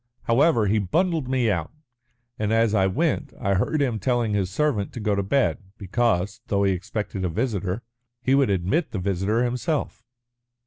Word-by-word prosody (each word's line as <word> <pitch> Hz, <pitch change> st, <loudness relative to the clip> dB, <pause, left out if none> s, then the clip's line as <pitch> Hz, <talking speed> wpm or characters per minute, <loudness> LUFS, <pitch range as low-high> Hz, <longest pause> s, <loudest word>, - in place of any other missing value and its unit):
However, 120 Hz, -1 st, +3 dB
he 105 Hz, +2 st, +2 dB
bundled 160 Hz, -, 0 dB
me 125 Hz, -4 st, +2 dB
out, 85 Hz, -5 st, -2 dB, 0.7 s
and 105 Hz, 0 st, 0 dB
as 115 Hz, -1 st, +3 dB
I 95 Hz, -3 st, +3 dB
went 145 Hz, -, -1 dB
I 100 Hz, -5 st, +1 dB
heard 140 Hz, +10 st, +1 dB
him 120 Hz, -5 st, -1 dB
telling 120 Hz, 0 st, 0 dB
his 100 Hz, -3 st, 0 dB
servant 115 Hz, -3 st, 0 dB
to -, -, -6 dB
go 105 Hz, -1 st, 0 dB
to 100 Hz, -, +1 dB
bed, 120 Hz, +5 st, +1 dB, 0.2 s
because, 105 Hz, 0 st, 0 dB
though 100 Hz, 0 st, +1 dB
he 100 Hz, -, +3 dB
expected 95 Hz, +1 st, -4 dB
a 90 Hz, -, 0 dB
visitor, 100 Hz, 0 st, -2 dB, 0.4 s
he 130 Hz, +2 st, +1 dB
would 135 Hz, -3 st, +4 dB
admit 100 Hz, -, 0 dB
the -, -, -2 dB
visitor 100 Hz, +5 st, 0 dB
himself." 125 Hz, +3 st, -2 dB
110 Hz, 175 wpm, -24 LUFS, 100-130 Hz, 0.7 s, would